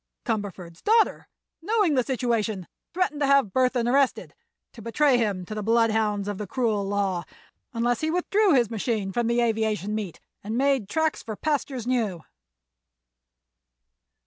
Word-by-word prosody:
Cumberford's 195 -7 -4
daughter, 445 +1 +2 0.3
knowing 415 -2 +2
the 260 - +3
situation, 230 -6 -1 0.3
threatened 345 -4 -1
to 285 - +2
have 275 -8 +3
Burthon 250 -2 +2
arrested—to 260 -2 -2
betray 250 +3 +2
him 200 -5 -1
to 215 - -7
the 215 - -3
bloodhounds 220 -2 +1
of 205 -2 -4
the 210 - -4
cruel 220 -3 0
law—unless 205 +4 -3
he 315 - 0
withdrew 360 +2 +2
his 240 -3 +2
machine 215 -3 -2
from 235 +3 0
the 235 +1 +2
aviation 220 -3 0
meet 210 -6 -4 0.2
and 215 +3 -3
made 270 -6 +1
tracks 315 -1 0
for 220 -1 -6
pastures 275 -3 -2
new." 225 -9 -1
230 Hz, 140 wpm, -25 LUFS, 210-275 Hz, 0.3 s, the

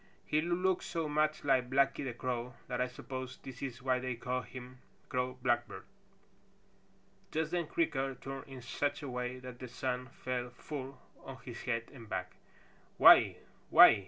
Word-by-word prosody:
He 155 - +2
looks 180 +2 +1
so 165 -2 -1
much 155 +1 +1
like 130 -3 +3
Blacky 135 +1 +3
the 130 -3 -3
Crow 125 -1 -3
that 125 0 -1
I 125 - +2
suppose 130 0 -6
this 130 -2 -8
is 125 -3 -5
why 130 -1 +2
they 130 -1 -2
call 125 +2 -2
him 125 0 -10 0.3
Crow 125 -1 -1
Blackbird." 120 -2 +1 1.5
Just 160 0 -1
then 175 -3 0
Creaker 135 - 0
turned 135 +1 -7
in 130 -2 -9
such 145 +3 -1
a - - -4
way 125 0 -3
that 125 -1 -9
the 125 - -6
sun 125 +1 -2
fell 125 0 -3
full 135 +2 -7 0.2
on 135 -1 -8
his 120 -2 -7
head 115 -2 -1
and 115 -5 -11
back. 90 -3 -2 0.7
"Why! - - +9 0.3
Why - - +11
ee!" - - +1
130 Hz, 170 wpm, -34 LUFS, 125-140 Hz, 1.5 s, Why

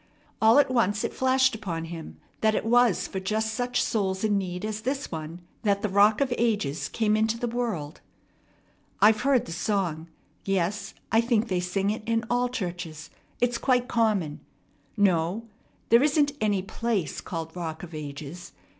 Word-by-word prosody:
All 220 +3 +6
at 290 -2 +4
once 205 -4 +2
it - - -2
flashed 260 0 +3
upon 175 -7 -4
him 165 -1 -8 0.2
that 220 0 +2
it - - -1
was 240 -2 +3
for 190 - -4
just 215 +3 -1
such 245 +1 0
souls 190 -3 -1
in 210 -1 +2
need 185 0 -2
as 215 0 -3
this 270 +4 -3
one 160 +1 -6 0.2
that 200 -2 +1
the 210 - +1
Rock 205 +5 +4
of 265 -3 +1
Ages 205 -10 0
came 215 -2 +1
into 220 +1 +1
the 240 - -2
world. 220 -11 -3 1.0
"I've 215 0 +5
heard 260 -3 +3
the - - -8
song. 170 -3 -1 0.4
Yes, 195 +1 -1 0.2
I 225 - +5
think 235 -1 +1
they 185 -2 +1
sing 190 +3 0
it 220 +3 -4
in 230 0 +1
all 245 0 +2
churches. 175 -8 -5 0.3
It's 245 -1 +1
quite 250 -2 +2
common. 215 - +1 0.6
No, 190 +2 +2 0.4
there 235 +2 +6
isn't 290 0 +3
any 205 -3 +1
place 200 - -2
called 165 -1 -6
Rock 160 -2 -5
of 175 -1 -9
Ages. 155 +3 -7
210 Hz, 170 wpm, -26 LUFS, 175-235 Hz, 1.0 s, All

